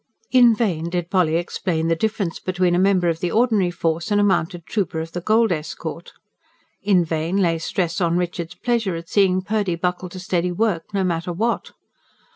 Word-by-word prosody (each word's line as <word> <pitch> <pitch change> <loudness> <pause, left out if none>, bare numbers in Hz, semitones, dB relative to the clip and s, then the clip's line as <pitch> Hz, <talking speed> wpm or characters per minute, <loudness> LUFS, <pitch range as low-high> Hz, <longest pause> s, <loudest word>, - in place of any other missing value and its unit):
In 245 -3 +6
vain 175 -7 -1
did 175 0 -3
Polly 180 -5 +2
explain 165 -1 -1
the 165 - +2
difference 200 -2 -2
between 180 -1 0
a 175 - +2
member 185 -2 +3
of 165 -1 0
the 175 - -1
ordinary 215 -4 +2
force 170 +1 -2
and 205 -1 +2
a - - +4
mounted 175 -3 0
trooper 185 -7 -2
of 165 +1 -5
the 175 - -4
gold 220 +3 +3
escort; 165 +1 -5 0.7
in 190 -4 +3
vain 160 +3 -1
lay 170 -4 +2
stress 180 +3 -2
on 170 0 +2
Richard's 175 -1 -3
pleasure 230 -7 -1
at 165 0 -8
seeing 185 -2 +3
Purdy 205 -3 0
buckle 180 +1 -2
to 185 - -9
steady 180 -1 -1
work, 175 -3 -1
no 200 -1 0
matter 175 -1 -1
what. 225 +7 -2
180 Hz, 190 wpm, -22 LUFS, 170-200 Hz, 0.7 s, In